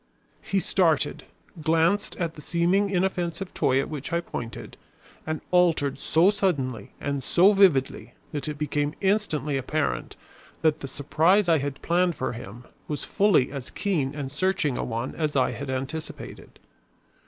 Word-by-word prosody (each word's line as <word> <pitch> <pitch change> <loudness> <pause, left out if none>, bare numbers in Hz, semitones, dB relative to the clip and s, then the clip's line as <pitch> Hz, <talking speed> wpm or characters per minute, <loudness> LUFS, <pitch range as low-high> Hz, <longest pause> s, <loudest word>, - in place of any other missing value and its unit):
He 195 - 0
started, 170 -6 +1 0.4
glanced 165 +6 +2
at 170 -3 -2
the 150 - -11
seeming 180 +6 +1
inoffensive 185 -1 -1
toy 130 0 +2
at 135 - -1
which 150 0 -6
I 170 - +2
pointed, 120 -9 -7 0.5
and 155 0 -2
altered 165 -6 +3
so 170 +8 +4
suddenly 145 - -1
and 140 -1 -2
so 190 +9 +5
vividly 180 -10 +2 0.2
that 145 0 -3
it 150 -1 -4
became 145 0 -1
instantly 175 -9 +1
apparent 135 - -2 0.5
that 155 -2 +3
the 135 - -6
surprise 160 +8 +2
I 165 -2 +4
had 140 0 -5
planned 175 0 +2
for 130 - -2
him 115 +1 -9 0.2
was 150 - -3
fully 195 -12 +3
as 140 -3 -6
keen 150 -9 -1
and 140 -3 -4
searching 155 -3 0
a - - -2
one 115 +2 -3
as 155 -2 -2
I 130 - +3
had 140 -1 -6
anticipated. 135 +5 -6
155 Hz, 155 wpm, -26 LUFS, 140-180 Hz, 0.5 s, so